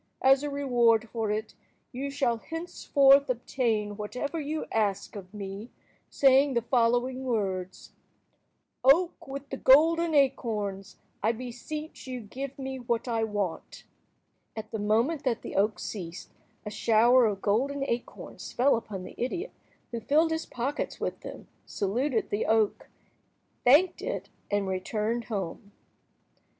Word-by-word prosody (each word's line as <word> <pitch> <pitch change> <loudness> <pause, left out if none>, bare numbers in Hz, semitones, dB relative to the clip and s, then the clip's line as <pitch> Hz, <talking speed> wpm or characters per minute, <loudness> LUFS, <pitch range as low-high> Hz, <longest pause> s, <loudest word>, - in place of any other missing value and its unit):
As 265 +1 +6
a 295 - -2
reward 240 -5 +2
for 225 -2 -2
it, 215 +1 -2 0.4
you 275 +2 -4
shall 270 -4 0
henceforth 280 -2 +3
obtain 225 -4 -1
whatever 250 +9 -4
you 305 +1 -3
ask 210 -3 -1
of 190 -2 -9
me, 200 +2 -7 0.4
saying 270 0 +4
the 235 - +1
following 245 +2 +1
words:— 190 -7 -3 0.9
"Oak 330 +7 +4
with 275 +1 -6
the 270 - -3
golden 325 +5 +5
acorns, 210 -8 0 0.2
I 220 +4 +2
beseech 255 +6 -7
you 255 -1 -4
give 260 +5 -7
me 265 -1 -5
what 235 0 -2
I 230 -2 0
want!" 205 -5 -3 0.7
At 220 -1 -7
the 220 - -3
moment 230 +9 +1
that 245 -4 -1
the - - -6
oak 210 +2 +2
ceased, 175 -4 -7 0.3
a 210 - -5
shower 235 +3 +4
of 200 -2 -3
golden 270 +7 +1
acorns 235 +1 -5
fell 260 +3 +4
upon 205 -5 -5
the - - -9
idiot, 345 - -3 0.4
who 235 - -3
filled 305 +8 +2
his 320 0 -2
pockets 265 +5 -3
with - - -3
them, - - -9 0.2
saluted 230 +5 -1
the 205 - -1
oak, 220 -2 +1 0.7
thanked 295 +9 +5
it, - - -4 0.2
and 205 -1 0
returned 215 +5 -2
home. 200 0 -5
240 Hz, 140 wpm, -28 LUFS, 210-275 Hz, 0.9 s, As